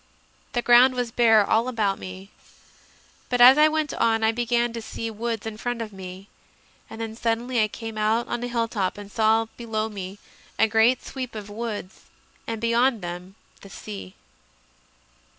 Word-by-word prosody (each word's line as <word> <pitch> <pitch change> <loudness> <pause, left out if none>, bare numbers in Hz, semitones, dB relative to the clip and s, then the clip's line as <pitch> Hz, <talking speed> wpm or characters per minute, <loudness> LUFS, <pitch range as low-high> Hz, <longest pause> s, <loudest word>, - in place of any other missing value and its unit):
The 240 -1 0
ground 250 +2 +6
was 245 -2 -2
bare 225 -3 +4
all 230 +3 +2
about 215 -6 0
me, 185 +2 -9 1.0
but 245 - 0
as 255 +4 +9
I 305 - +7
went 310 -2 -1
on 225 -1 +1
I 220 - +4
began 240 0 0
to 230 - -5
see 225 +1 -5
woods 225 0 -4
in 220 -1 -5
front, 245 +1 -3
and 190 -4 -7 0.7
then 225 0 -6
suddenly 235 +1 0
I 215 - +3
came 225 0 -7
out 220 +2 +1
on 240 - -3
a - - -2
hilltop 230 -6 -1
and 205 0 -10
saw 225 0 +3
below 220 -2 -2
me 195 -2 -7 0.4
a 225 - +4
great 225 +3 +3
sweep 255 -4 -6
of 205 -1 -7
woods 210 -3 -6 0.4
and 225 -1 -3
beyond 235 -1 +2
them 180 +2 -7 0.3
the 195 - -12
sea. 95 - -9
225 Hz, 165 wpm, -24 LUFS, 210-240 Hz, 1.0 s, as